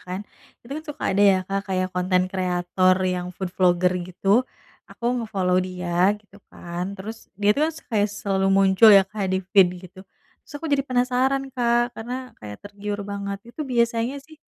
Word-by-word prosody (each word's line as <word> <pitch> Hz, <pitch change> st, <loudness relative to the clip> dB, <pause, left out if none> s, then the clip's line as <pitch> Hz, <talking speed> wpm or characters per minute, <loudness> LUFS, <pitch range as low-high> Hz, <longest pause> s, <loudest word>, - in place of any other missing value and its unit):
kan. 185 Hz, +2 st, -4 dB, 0.4 s
Itu 260 Hz, -, -8 dB
kan 310 Hz, +2 st, -5 dB
suka 295 Hz, -, -7 dB
ada 195 Hz, -, +1 dB
ya 195 Hz, -2 st, +6 dB
Kak 195 Hz, +1 st, -2 dB
kayak 185 Hz, -1 st, 0 dB
content 180 Hz, 0 st, +1 dB
creator 185 Hz, 0 st, +1 dB
yang 180 Hz, -1 st, -1 dB
food 190 Hz, -1 st, -4 dB
vlogger 180 Hz, 0 st, +3 dB, 0.2 s
gitu 185 Hz, +2 st, -6 dB, 0.6 s
aku -, -, -12 dB, 0.2 s
nge-follow 190 Hz, -5 st, 0 dB
dia 180 Hz, 0 st, 0 dB
gitu 205 Hz, -1 st, -21 dB
kan. 180 Hz, +3 st, -6 dB
Terus 220 Hz, +4 st, -9 dB
dia 205 Hz, 0 st, +3 dB
tuh 295 Hz, -, 0 dB
kan -, -, -4 dB
se -, -, -11 dB
kaya 210 Hz, -2 st, +2 dB
selalu 195 Hz, -2 st, -1 dB
muncul 195 Hz, +3 st, +5 dB
ya, 195 Hz, -1 st, +8 dB
Kak, 200 Hz, -2 st, -4 dB
di 190 Hz, -, +1 dB, 0.2 s
feed 195 Hz, -3 st, +7 dB, 0.2 s
gitu, 185 Hz, +1 st, -15 dB, 0.4 s
terus -, -, -17 dB
aku 325 Hz, -, -6 dB
jadi 280 Hz, -1 st, +3 dB
penasaran 255 Hz, +2 st, +1 dB
Kak 240 Hz, -1 st, +1 dB
karena 250 Hz, +3 st, -6 dB
kayak 105 Hz, -1 st, -7 dB
tergiur 205 Hz, 0 st, -5 dB
banget, 200 Hz, -1 st, -4 dB, 0.2 s
itu 310 Hz, -, -8 dB
biasanya 235 Hz, -1 st, 0 dB
sih 310 Hz, +3 st, -16 dB
200 Hz, 180 wpm, -23 LUFS, 185-235 Hz, 0.6 s, ya